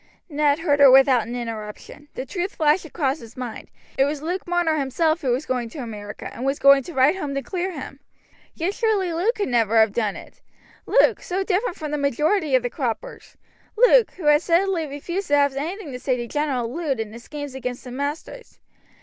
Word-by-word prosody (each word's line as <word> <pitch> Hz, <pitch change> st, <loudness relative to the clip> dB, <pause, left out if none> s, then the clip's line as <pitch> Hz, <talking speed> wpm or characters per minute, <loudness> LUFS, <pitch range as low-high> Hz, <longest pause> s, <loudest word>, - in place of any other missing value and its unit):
Ned 290 Hz, -1 st, +2 dB
heard 300 Hz, -3 st, +1 dB
her 280 Hz, -1 st, +9 dB
without 260 Hz, -3 st, +5 dB
an 240 Hz, -, -5 dB
interruption. 230 Hz, +4 st, -7 dB
The 255 Hz, -, -4 dB
truth 365 Hz, +4 st, -4 dB
flashed 310 Hz, +2 st, +2 dB
across 290 Hz, -2 st, -1 dB
his 230 Hz, -2 st, -13 dB
mind. 245 Hz, -3 st, -7 dB, 0.3 s
It 270 Hz, -, +5 dB
was 290 Hz, +1 st, -3 dB
Luke 355 Hz, +3 st, -3 dB
Marner 345 Hz, -3 st, +1 dB
himself 315 Hz, +4 st, 0 dB
who 265 Hz, -, -1 dB
was 250 Hz, +5 st, 0 dB
going 245 Hz, -2 st, -2 dB
to 270 Hz, -, -11 dB
America, 210 Hz, -5 st, -7 dB
and 240 Hz, -, -7 dB
was 275 Hz, +1 st, 0 dB
going 275 Hz, 0 st, +6 dB
to 345 Hz, -, -8 dB
write 270 Hz, +7 st, +4 dB
home 285 Hz, -7 st, -4 dB
to 275 Hz, -, -2 dB
clear 370 Hz, 0 st, -3 dB
him. 275 Hz, -2 st, -8 dB, 0.6 s
Yet 355 Hz, +4 st, -1 dB
surely 410 Hz, -6 st, 0 dB
Luke 390 Hz, +9 st, +1 dB
could 405 Hz, -, -2 dB
never 230 Hz, -2 st, +2 dB
have 220 Hz, -2 st, +4 dB
done 215 Hz, -4 st, -1 dB
it -, -, -13 dB, 0.5 s
Luke, -, -, +4 dB
so 375 Hz, +2 st, -2 dB
different 385 Hz, 0 st, -1 dB
from 305 Hz, -2 st, -5 dB
the 300 Hz, -, -1 dB
majority 300 Hz, -, +1 dB
of 255 Hz, -, +2 dB
the 245 Hz, -, -1 dB
croppers 240 Hz, -8 st, -5 dB, 0.4 s
Luke, -, -, +6 dB
who 355 Hz, -, -9 dB
had 295 Hz, 0 st, +5 dB
steadily 340 Hz, -1 st, +1 dB
refused 345 Hz, +7 st, -5 dB
to 290 Hz, -, +3 dB
have 285 Hz, -1 st, +2 dB
anything 320 Hz, +3 st, -4 dB
to 250 Hz, -, -6 dB
say 255 Hz, -1 st, 0 dB
to 240 Hz, -, -4 dB
General 275 Hz, -4 st, -1 dB
Lud 275 Hz, -1 st, -3 dB
and 220 Hz, -1 st, -4 dB
his 235 Hz, +1 st, -11 dB
schemes 290 Hz, -1 st, -7 dB
against 250 Hz, -2 st, -5 dB
the 250 Hz, -, -9 dB
masters. 290 Hz, -, -6 dB
285 Hz, 210 wpm, -23 LUFS, 255-340 Hz, 0.6 s, her